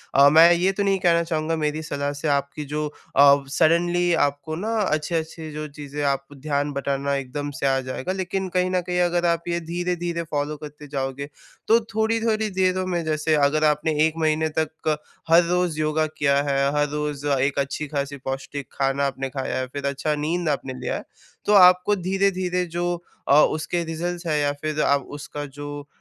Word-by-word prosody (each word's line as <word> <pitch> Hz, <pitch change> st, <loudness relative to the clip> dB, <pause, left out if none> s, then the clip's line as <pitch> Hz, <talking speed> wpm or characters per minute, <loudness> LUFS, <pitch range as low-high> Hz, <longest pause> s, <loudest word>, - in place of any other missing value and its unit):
अ, 140 Hz, +1 st, +8 dB
मैं 165 Hz, +3 st, +8 dB
ये 180 Hz, +3 st, +2 dB
तो 200 Hz, -, -1 dB
नहीं 195 Hz, -1 st, +2 dB
कहना 170 Hz, -1 st, +3 dB
चाहूँगा 160 Hz, -1 st, -1 dB
मेरी 155 Hz, 0 st, -1 dB
सलाह 145 Hz, -1 st, -2 dB
से 145 Hz, +2 st, -4 dB
आपकी 140 Hz, +1 st, -1 dB
जो 150 Hz, +1 st, -2 dB, 0.3 s
अ, 140 Hz, 0 st, +6 dB
सडनली 175 Hz, +2 st, +3 dB
आपको 145 Hz, +3 st, -4 dB
ना 210 Hz, +6 st, -3 dB
अच्छे-अच्छे 160 Hz, -1 st, -2 dB
जो 155 Hz, 0 st, -5 dB
चीज़ें 145 Hz, 0 st, -6 dB
आप 140 Hz, 0 st, 0 dB
ध्यान 145 Hz, 0 st, -1 dB
बँटाना 140 Hz, 0 st, -1 dB
एकदम 140 Hz, +2 st, -4 dB
से -, -, -1 dB
आ 135 Hz, 0 st, +2 dB
जाएगा। 130 Hz, +7 st, -4 dB
लेकिन 190 Hz, 0 st, -2 dB
कहीं 180 Hz, 0 st, +2 dB
न 180 Hz, -1 st, +1 dB
कहीं 180 Hz, 0 st, 0 dB
अगर 175 Hz, 0 st, +1 dB
आप 170 Hz, 0 st, +1 dB
ये 170 Hz, 0 st, 0 dB
धीरे-धीरे 175 Hz, -1 st, -2 dB
फॉलो 145 Hz, +1 st, -2 dB
करते 150 Hz, 0 st, -10 dB
जाओगे, 135 Hz, 0 st, -4 dB, 0.4 s
तो 225 Hz, +1 st, +6 dB, 0.2 s
थोड़ी-थोड़ी 220 Hz, -1 st, +1 dB
देर 185 Hz, -1 st, +1 dB
में 175 Hz, -2 st, -1 dB
जैसे 155 Hz, 0 st, +1 dB
अगर 150 Hz, +1 st, +2 dB
आप 150 Hz, -1 st, +4 dB
आपने 155 Hz, +1 st, -1 dB
1 160 Hz, -, -4 dB
महीने 155 Hz, 0 st, +1 dB
तक 155 Hz, -1 st, -1 dB, 0.3 s
हर 170 Hz, +1 st, +7 dB
रोज़ 180 Hz, -3 st, 0 dB
योगा 155 Hz, 0 st, +1 dB
किया 140 Hz, -1 st, +2 dB
है, 140 Hz, -1 st, +1 dB
हर 145 Hz, 0 st, +2 dB
रोज़ 150 Hz, -1 st, -3 dB
एक 135 Hz, +1 st, +1 dB
अच्छी 140 Hz, +2 st, -2 dB
ख़ासी 140 Hz, -1 st, -3 dB
पौष्टिक 135 Hz, +1 st, -5 dB
खाना 135 Hz, +1 st, 0 dB
आपने 135 Hz, 0 st, -4 dB
खाया 130 Hz, -1 st, -3 dB
है, 130 Hz, -, -2 dB
फिर 140 Hz, +2 st, -6 dB
अच्छा 140 Hz, +2 st, -1 dB
नींद 160 Hz, +3 st, -1 dB
आपने 135 Hz, -2 st, -2 dB
लिया -, -, -2 dB
है, -, -, -5 dB, 0.4 s
तो 210 Hz, -, +3 dB
आपको 180 Hz, +1 st, +6 dB
धीरे-धीरे 185 Hz, -1 st, 0 dB
जो 175 Hz, 0 st, 0 dB, 0.3 s
अ, 145 Hz, +2 st, +7 dB
उसके 170 Hz, +2 st, -1 dB
रिज़ल्ट्स 170 Hz, +2 st, -4 dB
हैं 155 Hz, -2 st, +1 dB
या 145 Hz, 0 st, +1 dB
फिर 155 Hz, 0 st, -1 dB
आप 140 Hz, -1 st, +2 dB
उसका 145 Hz, 0 st, -6 dB
जो 145 Hz, 0 st, -6 dB
155 Hz, 190 wpm, -23 LUFS, 140-175 Hz, 0.4 s, अ